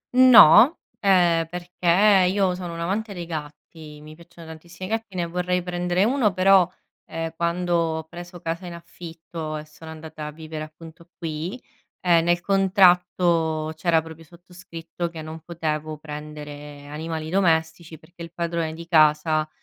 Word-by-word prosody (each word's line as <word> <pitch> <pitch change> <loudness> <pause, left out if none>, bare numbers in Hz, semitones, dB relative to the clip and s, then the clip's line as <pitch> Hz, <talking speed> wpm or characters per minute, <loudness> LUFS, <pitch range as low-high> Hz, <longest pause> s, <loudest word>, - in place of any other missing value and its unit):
No, 255 - +8 0.2
ehm, 175 -4 +3
perché 180 +3 +2
io 195 -2 +1
sono 180 -2 -6
un 165 - -7
amante 200 +4 -3
dei 175 -1 -6
gatti, 150 -1 -9
mi 155 - -12
piacciono 170 +1 -15
tantissimi 170 +3 -10
i - - -9
gatti, 225 -3 -4
ne 175 -1 -1
vorrei 180 +1 -2
prendere 180 +1 -1
uno 235 -3 +2
però, 185 -1 +4 0.4
ehm, 165 0 -5
quando 175 +1 -1
ho 160 -1 -1
preso 175 +2 -11
casa 170 +2 -5
in 170 - -7
affitto, 165 -2 -8
e 150 - -8
sono 155 +1 -14
andata 155 -1 -8
a 150 - -6
vivere 155 0 -7
appunto 165 +2 -15
qui, 165 +8 -5 0.4
ehm, 170 -2 +3
nel 175 0 +1
contratto 180 -5 +2
c'era 160 0 +1
proprio 160 0 -12
sottoscritto, 170 0 -8
che 160 -2 -9
non 160 +1 -8
potevo 155 -2 -4
prendere 150 -1 -9
animali 160 +2 -6
domestici, 160 -3 0
perché 170 +3 -18
il 165 -1 -8
padrone 170 -2 -3
di 170 +1 -10
casa 155 -1 +3
170 Hz, 155 wpm, -23 LUFS, 160-180 Hz, 0.4 s, No